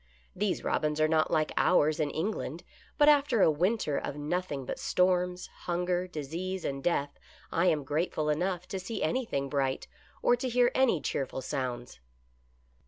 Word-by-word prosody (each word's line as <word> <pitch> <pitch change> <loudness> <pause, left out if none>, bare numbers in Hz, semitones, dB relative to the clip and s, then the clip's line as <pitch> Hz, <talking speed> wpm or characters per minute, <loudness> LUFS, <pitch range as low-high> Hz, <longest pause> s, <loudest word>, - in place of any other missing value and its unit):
" - - -35
These 205 - 0
robins 150 0 0
are 155 - +4
not 155 0 +2
like 155 -2 +1
ours 155 -3 +3
in 150 -2 +1
England, 180 +9 -3 0.3
but 295 - +5
after 280 -7 +5
a - - +6
winter 175 -1 0
of 140 - -5
noth 175 +5 -2
ing 135 -2 -4
but - - -5
storms, 180 0 +1 0.2
hunger, 180 +1 0
disease 175 +4 -4
and 135 0 -3
death, 145 -5 0 0.3
I 170 +3 +2
am 150 -4 +2
grate 150 +6 -1
ful 155 -1 0
enough 180 +3 -1
to 190 - -3
see 185 +5 -4
anything 155 - -1
bright, 135 -2 -1 0.4
or 245 - +5
to 255 +1 -3
hear 245 0 +3
any 255 - +3
cheerful 130 -1 -2
sounds." 125 - -4
165 Hz, 170 wpm, -30 LUFS, 145-185 Hz, 0.4 s, a